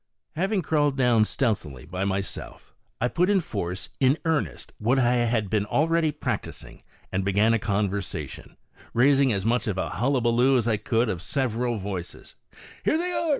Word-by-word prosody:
Having 190 Hz, +3 st, 0 dB
crawled 145 Hz, -2 st, +1 dB
down 120 Hz, -4 st, +4 dB
stealthily 85 Hz, -, -2 dB
by 90 Hz, +4 st, -3 dB
myself, 100 Hz, 0 st, -4 dB, 0.3 s
I 120 Hz, -, +2 dB
put 180 Hz, +8 st, +1 dB
in 205 Hz, -, +4 dB
forcein 120 Hz, -, -1 dB
earnest 130 Hz, -, -1 dB
what 120 Hz, +5 st, +2 dB
I 125 Hz, -2 st, +3 dB
had 115 Hz, -3 st, +1 dB
been 105 Hz, +1 st, 0 dB
already 160 Hz, +3 st, +2 dB
practising, -, -, -5 dB, 0.3 s
and 95 Hz, +1 st, -1 dB
began 105 Hz, +4 st, +3 dB
a 115 Hz, -, +2 dB
conversation, 100 Hz, -1 st, -3 dB, 0.4 s
raising 135 Hz, +2 st, +4 dB
as 100 Hz, -2 st, -1 dB
much 115 Hz, 0 st, +1 dB
of 100 Hz, -3 st, -1 dB
a -, -, -1 dB
hullabullo 125 Hz, +3 st, +2 dB
as 120 Hz, -2 st, 0 dB
I 110 Hz, -2 st, +2 dB
could 115 Hz, +3 st, +1 dB
of 90 Hz, -6 st, -3 dB
several 120 Hz, -1 st, -1 dB
voices: 95 Hz, -3 st, -6 dB, 0.2 s
" -, -, -19 dB
Here 310 Hz, -, +2 dB
they 355 Hz, +2 st, -2 dB
are 335 Hz, -2 st, -1 dB
115 Hz, 165 wpm, -25 LUFS, 100-135 Hz, 0.4 s, down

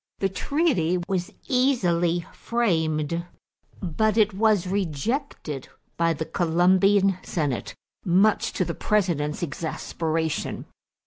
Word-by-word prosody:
The 195 Hz, -, 0 dB
treaty 195 Hz, -, +1 dB
was 185 Hz, -3 st, -2 dB, 0.2 s
easily 175 Hz, -, +2 dB
framed, 170 Hz, -8 st, 0 dB, 0.6 s
but 215 Hz, +5 st, +1 dB
it 215 Hz, -2 st, +4 dB
was 210 Hz, -2 st, +2 dB
rejected 185 Hz, -, -3 dB, 0.3 s
by 165 Hz, 0 st, +2 dB
the 160 Hz, +1 st, -4 dB
Colombian 185 Hz, +4 st, +3 dB
senate, 145 Hz, -7 st, -2 dB, 0.3 s
much 195 Hz, +3 st, +3 dB
to 185 Hz, -, 0 dB
the 170 Hz, -, -3 dB
President's 170 Hz, -9 st, 0 dB
exasperation. 160 Hz, 0 st, -3 dB
180 Hz, 100 wpm, -25 LUFS, 160-205 Hz, 0.6 s, it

